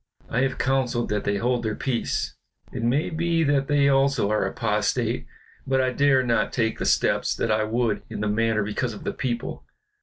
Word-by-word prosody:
I 115 - +1
have 135 -1 0
counseled 130 -2 0
that 105 0 -1
they 100 0 +1
hold 120 +3 0
their 110 -2 -2
peace; 125 -4 -2 0.4
it - - -4
may 125 +9 +1
be 165 0 +1
that 140 -2 +1
they 145 -1 +3
also 135 -6 +2
are 110 - +1
apostate, 105 -3 -1 0.4
but 135 0 +2
I 130 -1 +2
dare 140 -2 +3
not 120 -2 +1
take 110 -3 -1
the - - -2
steps - - +2
that 115 - -1
I 110 0 +2
would 115 -1 0
in - - -6
the 105 - 0
matter 110 0 +1
because 110 +3 -2
of - - -10
the - - -2
people. 120 -3 -3
120 Hz, 195 wpm, -24 LUFS, 110-135 Hz, 0.4 s, they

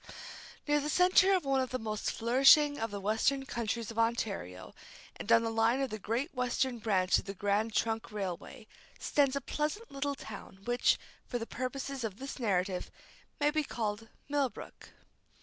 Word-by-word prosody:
Near 295 0 +3
the 295 +1 -3
centre 370 +3 +5
of 365 - -1
one 270 -1 +2
of 255 - -2
the 255 - -2
most 215 -3 -3
flourishing 275 +5 +5
of 225 - -1
the 200 -1 -5
western 225 +7 +1
counties 235 -2 -3
of 225 - -5
Ontario, 210 - -2 0.4
and 215 - -5
on 230 0 +6
the 225 - -1
line 225 +3 +2
of 270 -4 -1
the 215 - -4
Great 235 - -2
Western 250 -1 0
branch 195 -4 +2
of - - -9
the 195 0 -6
Grand 205 +3 0
Trunk 225 -1 0
Railway, 195 +1 -5 0.3
stands 280 -2 +2
a 280 - -1
pleasant 300 - -3
little 280 +1 -2
town, 200 -5 -10
which, 245 +1 +3 0.3
for 245 - -2
the 230 - -4
purposes 260 +2 -4
of 210 -3 -4
this 270 +2 -7
narrative, 185 -5 0 0.5
may 295 0 +3
be 310 0 +1
called 220 -4 -3 0.2
Millbrook. 285 -2 -3
235 Hz, 175 wpm, -32 LUFS, 215-275 Hz, 0.5 s, on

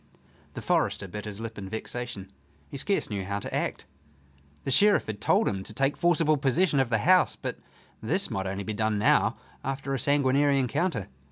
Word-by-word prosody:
The - - -6
forester - - +1
bit 105 +4 -7
his 105 -1 -6
lip 115 -1 -6
in 95 -1 -7
vexation. 110 -2 -5 0.4
He 140 - -5
scarce 195 - -1
knew 100 -2 -2
how 100 +2 -3
to 100 - -6
act. - - -2 0.8
The - - -2
Sheriff 205 +9 +5
had 105 -2 -6
told - - +3
him 95 -1 -1
to 110 - -8
take 135 +3 +1
forcible 165 -3 +3
possession 140 +3 +2
of 135 -3 +2
the 115 - +2
house, 185 +1 +5
but - - -5 0.4
this - - -1
might 95 0 -2
only 95 +1 -3
be 110 - -4
done 110 0 0
now 105 - +3 0.3
after 135 +1 -3
a 135 - -1
sanguinary 140 +1 +3
encounter. 130 - 0
125 Hz, 190 wpm, -27 LUFS, 105-145 Hz, 0.8 s, Sheriff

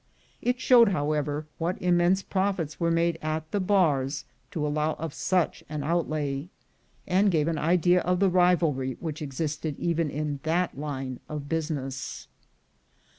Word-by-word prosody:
It 245 0 0
showed, 240 -4 +6
however, 150 -3 -1
what 170 +3 -1
immense 180 +2 +3
profits 190 -5 -1
were 170 -1 +1
made 165 0 +1
at 155 0 -3
the 205 - 0
bars 155 -8 +1 0.2
to 160 -6 -2
allow 150 +1 0
of 160 -3 -5
such 180 -3 0
an 150 -1 -3
outlay, 155 -2 -1 0.6
and 195 +3 +3
gave 160 -4 +2
an 165 -2 0
idea 175 +2 +3
of 180 0 0
the 195 -2 +3
rivalry 165 -8 +2
which 155 -2 -5
existed 150 +1 -3
even 170 -2 0
in 145 0 -3
that 170 +3 0
line 135 -3 -4
of 150 -2 -5
business. 145 -5 -3
160 Hz, 145 wpm, -27 LUFS, 145-180 Hz, 0.6 s, showed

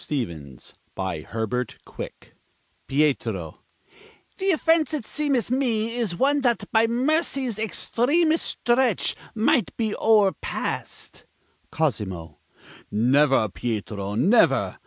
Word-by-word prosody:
STEVENS 80 - -5 0.2
BY 95 -4 -3
HERBERT 115 +6 -3
QUICK - - -9 0.5
Pietro: 120 - 0 0.8
Th' 385 0 +2
offense, 320 -1 +2
it 280 - -5
seemeth 275 -6 -1
me, 230 -4 0
Is 225 -8 -1
one 285 +6 +2
that 240 -3 +1
by 225 0 +4
mercy's 260 -2 0
extremest 300 - +1
stretch 240 -2 +1 0.2
Might 225 +2 +1
be 220 -2 -1
o'erpassed. 210 -3 0 0.5
Cosimo: 95 - -2 0.5
Never, 130 +3 +3
Pietro, 105 -2 -4
never! 180 - +3
215 Hz, 95 wpm, -24 LUFS, -, 0.8 s, by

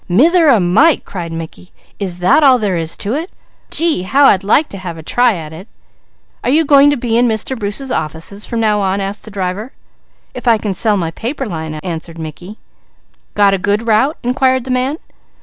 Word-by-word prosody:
"Mither 320 - +4
o' 235 -6 +5
Mike!" 215 - +3
cried 170 -3 -6
Mickey. 165 +2 -8 0.3
"Is 185 -4 -3
that 185 - +3
all 265 -3 +6
there 205 -5 -1
is 165 -1 -2
to 210 +3 -2
it? 325 +6 -3 0.4
Gee, 330 - +1
how 270 +10 +3
I'd 195 -7 +4
like 275 +10 +3
to 195 - -8
have 175 -3 -7
a 160 - -10
try 245 +6 +2
at 160 -2 -8
it." 180 +6 -11 0.8
"Are - - 0
you 310 +4 +3
going 280 0 +6
to 290 - +1
be 235 -1 0
in 245 - +3
Mr. 220 +3 -1
Bruce's 230 +4 -4
office 165 +6 -4
from 235 - -3
now 215 -2 +2
on?" 195 0 0
asked 195 +1 -4
the - - -8
driver. 200 +4 -4 0.6
"If - - -8
I 230 -2 +5
can 210 -2 -3
sell 210 +2 0
my 165 -3 -2
paper 265 - -4
line," 160 -6 -5
answered 165 -1 -6
Mickey. 165 +6 -8 0.8
"Got 200 -1 +4
a 195 - 0
good 205 +4 -1
route?" 230 +7 +2
inquired 260 +1 +1
the 255 - -5
man. 255 +4 0
210 Hz, 205 wpm, -15 LUFS, 180-255 Hz, 0.8 s, all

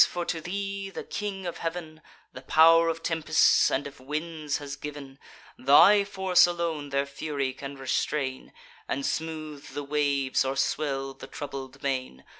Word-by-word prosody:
for 175 -1 -3
to 165 -1 -2
thee 195 +2 -4
the - - -7
King 200 -2 -5
of 175 - -5
Heav'n 165 -2 -5 0.3
The 125 - -9
pow'r 165 +4 +6
of 165 0 -3
tempests 160 -2 +4
and 140 +2 -1
of 140 -2 -9
winds 150 +2 -3
has 140 -1 -6
giv'n; 140 -1 -9 0.4
Thy 195 +10 +7
force 190 -3 +4
alone 165 -4 -3
their 140 0 0
fury 140 -1 -3
can 140 +1 -8
restrain, 135 0 -2 0.4
And 135 +1 -2
smooth 155 -2 -4
the 145 - -3
waves, 140 -3 +1
or 135 0 -2
swell 135 -3 -1
the 135 - -11
troubled 135 -2 -7
main. 130 - -3
150 Hz, 155 wpm, -27 LUFS, 140-165 Hz, 0.4 s, Thy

